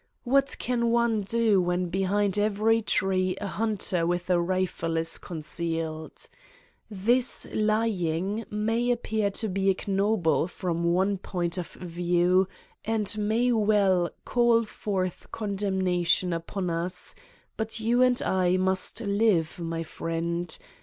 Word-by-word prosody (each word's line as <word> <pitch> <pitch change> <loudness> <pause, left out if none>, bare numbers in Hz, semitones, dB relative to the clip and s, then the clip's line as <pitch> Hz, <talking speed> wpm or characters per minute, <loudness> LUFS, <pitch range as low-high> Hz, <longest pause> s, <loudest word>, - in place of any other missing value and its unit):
What 275 +2 +2
can 235 -1 0
one 235 -2 +2
do 215 -1 +2
when 180 0 0
behind 195 +2 +1
every 215 +2 +2
tree 185 -2 +1
a - - -4
hunter 195 -4 0
with 175 +1 -1
a 175 -1 +3
rifle 175 -2 -1
is 165 0 -1
concealed! 160 -1 -4 0.6
This 235 +5 +1
lying 210 -2 0
may 225 +3 0
appear 220 -3 0
to 220 +2 -1
be 195 0 0
ignoble 195 -3 +1
from 170 -2 -3
one 190 +3 +2
point 175 -1 -2
of 175 - -4
view 180 +1 +1 0.4
and 220 -2 0
may 220 +4 +1
well 205 -5 +3 0.2
call 235 -1 +3
forth 190 -4 -4
condemnation 190 -4 0
upon 175 +2 -3
us, 180 +2 -2 0.4
but 220 0 -3
you 235 +3 +2
and 250 -1 +4
I 185 -1 +2
must 190 +4 0
live, 200 -6 +1
my 165 -1 -3
friend. 165 +1 -3
190 Hz, 125 wpm, -27 LUFS, 175-220 Hz, 0.6 s, and